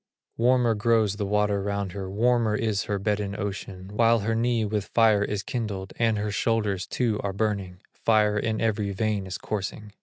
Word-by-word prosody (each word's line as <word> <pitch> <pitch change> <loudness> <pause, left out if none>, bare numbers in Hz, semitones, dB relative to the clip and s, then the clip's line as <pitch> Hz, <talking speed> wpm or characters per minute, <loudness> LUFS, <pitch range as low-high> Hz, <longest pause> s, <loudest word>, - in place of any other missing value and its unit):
Warmer 120 0 +3
grows 110 -2 +2
the 100 -2 -2
water 105 0 +1
round 100 -1 -2
her, 95 0 -5
Warmer 115 +1 +2
is 110 -3 0
her 105 - -1
bed 105 +1 0
in 100 0 -4
ocean, 100 -2 -5
While 115 +1 +4
her 115 +3 0
knee 115 0 +1
with 105 -1 -2
fire 110 -3 +5
is 105 -1 -2
kindled, 100 -6 -4
And 115 -2 +2
her 105 0 -2
shoulders 105 -3 0
too 115 -4 0
are 100 -1 -2
burning, 100 -3 -2
Fire 105 -2 +2
in 110 0 -1
every 105 -3 0
vein 105 -1 -1
is 90 - -4
coursing. 105 0 -5
105 Hz, 185 wpm, -26 LUFS, 100-115 Hz, -, fire